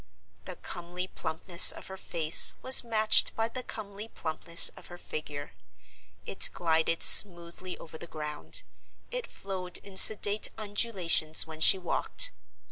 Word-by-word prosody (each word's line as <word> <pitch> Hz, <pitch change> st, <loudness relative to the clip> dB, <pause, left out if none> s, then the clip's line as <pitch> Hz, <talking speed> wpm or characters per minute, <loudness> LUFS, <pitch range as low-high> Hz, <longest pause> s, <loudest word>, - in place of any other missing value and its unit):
The 185 Hz, -, -8 dB
comely 175 Hz, +1 st, -9 dB
plumpness 170 Hz, 0 st, +3 dB
of -, -, -14 dB
her 190 Hz, -, -11 dB
face 165 Hz, -4 st, +1 dB
was 260 Hz, 0 st, +6 dB
matched 220 Hz, -2 st, +2 dB
by 225 Hz, 0 st, -3 dB
the 255 Hz, +2 st, -7 dB
comely 210 Hz, -3 st, -10 dB
plumpness 170 Hz, -3 st, +2 dB
of -, -, -17 dB
her 175 Hz, -, -13 dB
figure; 150 Hz, -4 st, -9 dB, 0.7 s
it -, -, +1 dB
glided 165 Hz, 0 st, -1 dB
smoothly 175 Hz, -1 st, +3 dB
over 160 Hz, -1 st, -14 dB
the 170 Hz, -, -9 dB
ground; 150 Hz, -2 st, -6 dB, 0.5 s
it -, -, -5 dB
flowed 185 Hz, -2 st, -7 dB
in 195 Hz, -1 st, -9 dB
sedate 210 Hz, +1 st, +3 dB
undulations 200 Hz, -7 st, -1 dB
when 160 Hz, -1 st, -13 dB
she 190 Hz, -, +5 dB
walked. 190 Hz, -, -3 dB
180 Hz, 135 wpm, -26 LUFS, 160-205 Hz, 0.7 s, was